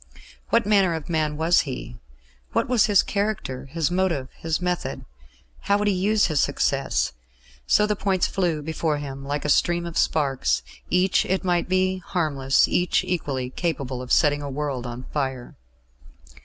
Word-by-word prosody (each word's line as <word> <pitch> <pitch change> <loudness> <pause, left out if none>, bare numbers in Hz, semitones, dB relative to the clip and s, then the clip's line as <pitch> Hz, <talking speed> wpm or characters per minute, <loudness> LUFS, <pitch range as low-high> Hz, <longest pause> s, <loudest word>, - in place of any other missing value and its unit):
What 230 - +3
manner 195 -5 +3
of 160 0 -7
man 155 -2 0
was 165 +3 +4
he? 125 -4 -5 0.5
What - - +1
was 240 -4 +3
his 205 -3 +5
character, 200 -11 -3
his 160 +3 -1
motive, 175 -8 0
his 160 -1 -2
method? 180 -1 -3 0.6
How 200 - +3
would 210 0 0
he 205 - +3
use 205 +3 +2
his 155 -4 0
success?... - - 0 0.5
So 210 - +4
the 210 0 0
points 195 -2 +1
flew 170 -6 -1
before 160 0 -1
him 140 -1 -6
like 145 +1 -3
a - - +1
stream 170 +3 +2
of 170 -1 -2
sparks, 140 -4 +1 0.3
each, 180 +1 +3
it 190 +1 0
might 175 -1 0
be, 185 0 +1
harmless; 145 -8 +1
each, 180 +1 +1
equally, 140 -8 -2
capable 135 -6 -3
of 125 - -8
setting 145 -2 +3
a 145 - -5
world 135 -3 -3
on 120 +1 -7
fire. 130 -4 -3
160 Hz, 165 wpm, -24 LUFS, 140-185 Hz, 0.6 s, his